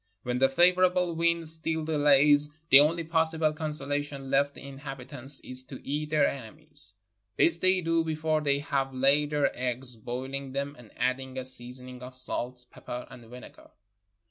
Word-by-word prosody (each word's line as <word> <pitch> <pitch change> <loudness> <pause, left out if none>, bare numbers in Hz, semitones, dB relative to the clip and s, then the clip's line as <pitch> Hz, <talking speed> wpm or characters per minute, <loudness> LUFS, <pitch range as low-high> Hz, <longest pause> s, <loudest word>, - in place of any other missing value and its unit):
When 125 0 -2
the 135 0 +3
favorable 180 +3 +2
wind 170 0 0
still 160 0 0
delays, 145 -1 +4 0.2
the 135 - +9
only 165 +3 +2
possible 160 -1 0
consolation 145 -2 -3
left 140 +1 +1
the 140 - -11
inhabitants 135 -1 +3
is 130 0 -1
to 130 - -10
eat 150 +2 -3
their 150 -2 +2
enemies; 145 -3 0 0.4
this 170 0 +4
they 185 +1 +2
do 165 0 0
before 155 -1 -1
they 140 -2 0
have 135 -2 -3
laid 140 +3 +2
their 150 -1 0
eggs, 125 0 -4
boihng 130 +4 -6
tliem 140 +1 -3
and 120 -5 -16
adding 130 +1 -2
a 130 - -3
seasoning 125 0 -1
of 125 0 -9
salt, 125 -1 -2
pepper, 125 0 -8
and 120 -2 -13
vinegar. 125 +1 -14
140 Hz, 160 wpm, -27 LUFS, 130-155 Hz, 0.4 s, the